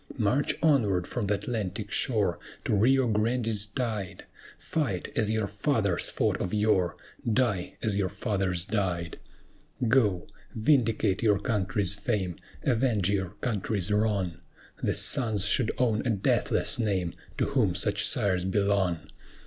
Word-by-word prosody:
March 120 +5 +1
onward 105 - +3
from 120 -5 -3
th' 105 - +2
Atlantic 105 -3 -3
shore, - - +1 0.3
To - - 0
Rio 130 +5 +3
Grande's 110 -1 +1
tide 105 -4 -4 0.3
Fight 120 - -2
as 110 -2 +1
your 110 -1 0
fathers 100 - 0
fought - - 0
of 90 - -2
yore! 105 -5 +1 0.3
Die 105 -6 0
as 110 -3 0
your 100 -2 0
fathers 95 -4 -1
died! 90 -6 -2 0.7
Go! 105 -8 +2 0.3
vindicate 110 -5 +2
your 105 -3 +3
country's 100 -2 0
fame, 100 -4 -2 0.3
Avenge 115 -7 +1
your 95 -2 -2
country's 105 -4 -2
wrong! 100 -5 0 0.4
The - - 0
sons 110 -8 +4
should 110 +3 +3
own 115 -4 +1
a 125 - -1
deathless 105 +2 +1
name, 95 -6 0 0.2
To - - +1
whom - - +1
such - - +1
sires 90 -3 +2
belong. 95 -3 +1
105 Hz, 135 wpm, -28 LUFS, 95-115 Hz, 0.7 s, sons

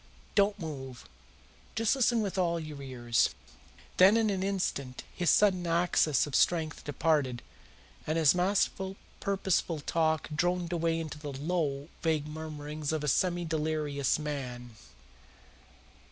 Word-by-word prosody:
Don't 200 0 +3
move! 135 -8 -7 0.7
Just 225 +3 +2
listen 240 -3 +2
with 200 - -3
all 170 -3 +1
your 155 -3 -7
ears." 120 -4 +1 0.7
Then 195 +4 +7
in 220 -2 +2
an 190 -2 -1
instant 180 -10 -2
his 175 -2 0
sudden 185 -4 +4
access 165 -4 +2
of 145 - -9
strength 160 -1 +1
departed, 145 -4 0 0.6
and 155 +1 0
his 155 -3 +5
masterful, 190 +1 0 0.2
purposeful 190 -4 0
talk 160 +1 0
droned 175 +1 0
away 165 -1 0
into 155 -2 -6
the 150 -1 -6
low, 145 -1 -2
vague 160 -3 +1
murmurings 150 -1 -5
of 155 -1 -2
a - - -2
semi 175 +4 +1
delirious 155 -3 0
man. 130 -5 -5
160 Hz, 130 wpm, -30 LUFS, 145-180 Hz, 0.7 s, Then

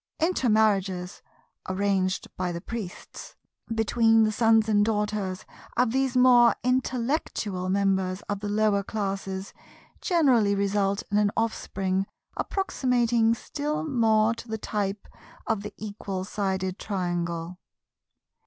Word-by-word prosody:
Intermarriages 215 - +1 0.5
(arranged 190 -1 0
by 180 -1 -2
the 170 - -4
Priests) 210 -1 -8 0.4
between 225 0 +3
the 215 - +2
sons 225 0 +3
and 205 -1 +3
daughters 210 -3 -1 0.3
of 245 -1 +3
these 265 0 +1
more 245 -2 +6
intellectual 245 - -1
members 190 -1 0
of 205 -1 -3
the 205 0 -4
lower 210 -1 +2
classes 195 -2 -4 0.5
generally 255 - +3
result 200 0 0
in 205 - +3
an 210 -1 +3
offspring 195 -4 -1 0.3
approximating 240 - +1
still 300 +6 -3
more 225 -4 +3
to 230 - -10
the 220 0 -3
type 205 -2 -3 0.4
of 220 -3 0
the 210 +1 -7
Equal 200 -3 -5
Sided 190 -1 -2
Triangle. 175 -3 -3
210 Hz, 115 wpm, -26 LUFS, 195-230 Hz, 0.5 s, more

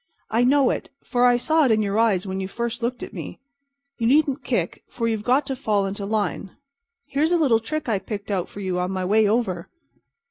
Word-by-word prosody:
I 230 +2 +3
know 270 +1 +4
it, - - -4
for 245 -1 +2
I 245 -1 +5
saw 315 +5 +2
it - - +3
in 215 -1 +3
your 200 +1 0
eyes 205 -5 +2
when 190 0 -3
you 190 - -3
first 235 +3 -4
looked 245 +1 -2
at - - -8
me. - - -7 0.6
You 230 - +1
needn't 280 0 +3
kick, - - -2
for 230 - -2
you've 220 -2 -1
got 260 +5 +2
to 270 - -3
fall 210 -6 0
into 200 +1 -4
line. 205 -2 -2 0.5
Here's 300 +4 +1
a 350 - +4
little 265 -9 +3
trick 305 +6 -4
I 215 -4 +1
picked 205 +1 -6
out 185 -3 -1
for 205 - -9
you 185 -2 -1
on 180 0 -1
my 185 -1 -2
way 210 +3 +4
over." 200 -6 -1
225 Hz, 225 wpm, -23 LUFS, 200-255 Hz, 0.6 s, I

